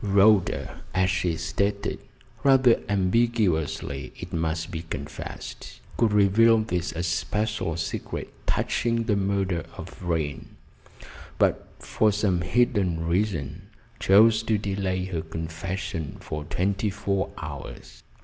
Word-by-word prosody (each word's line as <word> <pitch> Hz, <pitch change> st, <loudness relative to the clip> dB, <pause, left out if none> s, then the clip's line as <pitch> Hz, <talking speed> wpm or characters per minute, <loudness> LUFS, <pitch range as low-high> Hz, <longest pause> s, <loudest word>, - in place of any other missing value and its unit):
Rhoda, 100 Hz, -1 st, +3 dB
as 95 Hz, 0 st, +3 dB
she 90 Hz, -3 st, 0 dB
stated 100 Hz, +5 st, -1 dB, 0.4 s
rather 130 Hz, -3 st, +5 dB
ambiguously, 95 Hz, -8 st, +1 dB
it -, -, -8 dB
must 80 Hz, 0 st, -1 dB
be 80 Hz, -, -4 dB
confessed 80 Hz, -, -7 dB, 0.2 s
could 115 Hz, -3 st, +2 dB
reveal 105 Hz, +3 st, +5 dB
this 90 Hz, -6 st, -1 dB
especial 85 Hz, +2 st, -1 dB
secret 85 Hz, -, -4 dB
touching 115 Hz, -1 st, +1 dB
the 110 Hz, -3 st, +1 dB
murder 95 Hz, -3 st, 0 dB
of -, -, -7 dB
Vrain; 80 Hz, -5 st, -3 dB, 0.8 s
but, -, -, +2 dB
for 110 Hz, -1 st, +1 dB
some 100 Hz, -4 st, +1 dB
hidden 90 Hz, -4 st, +1 dB
reason, 85 Hz, -2 st, -1 dB, 0.3 s
chose 110 Hz, +2 st, +6 dB
to 110 Hz, -1 st, +1 dB
delay 95 Hz, -2 st, -1 dB
her 90 Hz, -4 st, -3 dB
confession 80 Hz, 0 st, -5 dB
for 75 Hz, -1 st, -5 dB
twenty 95 Hz, +6 st, 0 dB
four 100 Hz, -1 st, -1 dB
hours. 70 Hz, -3 st, -8 dB
95 Hz, 110 wpm, -26 LUFS, 85-105 Hz, 0.8 s, chose